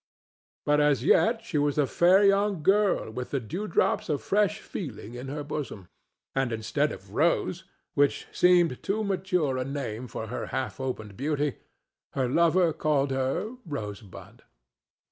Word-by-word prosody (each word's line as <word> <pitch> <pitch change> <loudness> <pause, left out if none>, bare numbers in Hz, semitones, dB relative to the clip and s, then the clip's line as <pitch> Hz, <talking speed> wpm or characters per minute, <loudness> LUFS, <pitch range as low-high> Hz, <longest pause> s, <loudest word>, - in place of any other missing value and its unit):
But 150 0 +3
as 145 -2 +3
yet 225 +7 +3
she 160 -9 -1
was 145 0 +1
a 145 - +4
fair 180 +8 +4
young 200 -3 +3
girl 200 - +2
with 125 +2 -5
the 140 - -1
dewdrops 170 - -1
of 145 -2 +1
fresh 210 +1 +1
feeling 120 - -7
in 125 +2 -7
her 145 +2 -4
bosom, 140 - -6 0.4
and, 135 -2 0
instead 110 -1 0
of - - -10
"Rose"—which 145 0 0
seemed 175 -6 +3
too 215 +3 -1
mature 180 -9 0
a - - 0
name 130 -4 -4
for 110 - -5
her 115 +3 -5
half 130 - -3
opened 110 -6 -5
beauty—her 145 -2 -4
lover 170 +4 +3
called 145 -3 +1
her 135 - -1
"Rosebud." 105 - -8
145 Hz, 145 wpm, -27 LUFS, 130-180 Hz, 0.4 s, a